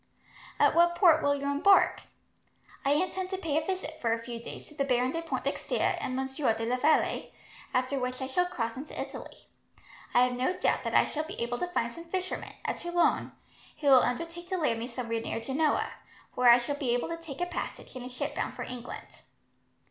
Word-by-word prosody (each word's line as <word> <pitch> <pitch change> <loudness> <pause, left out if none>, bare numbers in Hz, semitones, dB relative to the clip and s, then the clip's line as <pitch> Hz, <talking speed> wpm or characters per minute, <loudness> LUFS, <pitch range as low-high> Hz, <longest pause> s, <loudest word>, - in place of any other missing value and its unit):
"At - - +5
what 345 0 +4
port 340 -3 +6
will 285 0 +3
you 280 - -5
embark?" 290 +8 +4 0.8
"I 275 - +3
intend 370 +4 -1
to 380 - -2
pay 315 -4 0
a 315 - -9
visit, 345 -5 -4
for 230 - +1
a 230 - +2
few 235 -1 -6
days, - - -8
to - - -14
the 285 -2 0
Baron 250 -1 +2
de 330 - -2
Pointdexter 330 - -1
and 255 - -2
Monsieur 265 -2 0
de 225 0 -3
la 245 +2 +1
Vallee, 305 +4 +2 0.4
after 255 +2 0
which 255 0 -3
I 265 - -2
shall 355 +7 +1
cross 230 -9 -3
into 275 +4 -7
Italy. - - -7 0.7
I 245 - +7
have 250 0 +2
no 255 +9 0
doubt - - +1
that - - -1
I - - +6
shall 310 +1 -3
be - - -8
able 240 +1 -2
to 360 - -1
find 235 -6 0
some 335 +6 -10
fishermen, 370 +2 -4
at - - -2
Toulon, 345 -1 +1 0.5
who 285 - +3
will 260 -2 +8
undertake 335 +7 -3
to 375 0 -1
land 240 -9 +1
me 235 - -4
somewhere 235 -2 -3
near 225 - -3
Genoa, 275 +6 0 0.4
where 250 -1 +5
I 240 - +10
shall 265 +4 -3
be 250 -4 +1
able 245 - -2
to 335 - -3
take 325 -5 -9
a 355 - +1
passage 350 -5 -6
in 255 - -6
a 250 - -6
ship 285 +4 -4
bound - - -3
for - - -4
England." 250 -1 -8
280 Hz, 215 wpm, -29 LUFS, 250-335 Hz, 0.8 s, I